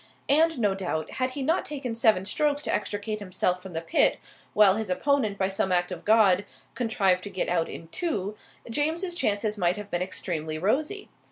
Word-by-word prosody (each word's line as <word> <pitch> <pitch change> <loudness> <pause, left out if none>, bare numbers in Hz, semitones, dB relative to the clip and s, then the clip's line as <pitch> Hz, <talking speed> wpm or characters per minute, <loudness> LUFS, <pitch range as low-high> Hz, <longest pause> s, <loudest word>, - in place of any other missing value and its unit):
And 320 +2 +4
no 205 -5 +2
doubt, 180 -5 -3
had 255 - +2
he 275 - -1
not 325 +6 +1
taken 270 -5 -4
seven 220 -5 +3
strokes 290 +6 0
to - - -1
extricate 210 +1 -2
himself 180 -2 -1
from 190 -1 -10
the 165 - -2
pit, 165 - +3 0.4
while 205 -2 +6
his 220 -2 -3
opponent, 220 0 +1
by 190 - +1
some 190 -1 -1
act 180 0 +1
of 180 - -7
God, 205 -3 +5 0.3
contrived 195 -7 +1
to - - -5
get 185 -2 -2
out 170 -2 +1
in 165 - -8
two, 210 - -2 0.3
James's 320 +9 -1
chances 210 - -1
might 180 +1 +2
have 210 -1 -8
been 175 - -1
extremely 160 -4 -3
rosy. 295 - -1
205 Hz, 190 wpm, -27 LUFS, 185-260 Hz, 0.4 s, while